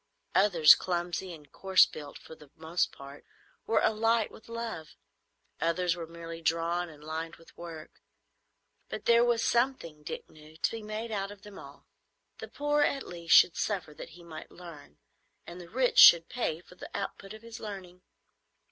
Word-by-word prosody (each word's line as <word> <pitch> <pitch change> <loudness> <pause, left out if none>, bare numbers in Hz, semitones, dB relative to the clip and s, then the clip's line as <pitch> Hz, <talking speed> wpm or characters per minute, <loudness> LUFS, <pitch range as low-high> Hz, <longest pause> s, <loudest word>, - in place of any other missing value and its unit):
Others, 180 -6 +7
clumsy 175 +1 -3
and 150 -4 -13
coarse 190 -2 +4
built 145 -2 -10
for - - -13
the 150 -3 -16
most 160 +2 -1
part, 140 +1 -12 0.4
were 225 - +2
alight 225 0 +1
with 220 - -16
love; 230 -9 -6 0.6
others 170 +1 0
were 170 -2 -7
merely 165 0 -9
drawn 170 +2 -1
and 150 -2 -15
lined 160 +2 -5
with 165 - -20
work; 165 -2 -10 0.9
but - - -7
there 235 0 +5
was 240 -1 +1
something, 235 - 0
Dick 150 - -7
knew, 155 +1 -17
to - - 0
be 225 - -6
made 215 +2 -6
out 195 -2 -2
of 205 -1 -13
them 205 -1 -11
all. - - -14 0.5
The - - -7
poor 295 +1 0
at 280 -2 +1
least 170 -1 +1
should 175 - +6
suffer 185 -7 -3
that - - -10
he 175 - -14
might 160 -2 -10
learn, 165 - -13 0.5
and 175 +1 -10
the 170 - -13
rich 250 +4 +2
should 165 -1 +9
pay 170 -9 -3
for 180 - -18
the 180 - -11
output 200 +1 -6
of 220 - -15
his 230 -1 -10
learning. 185 -4 -9
175 Hz, 175 wpm, -29 LUFS, 165-215 Hz, 0.9 s, should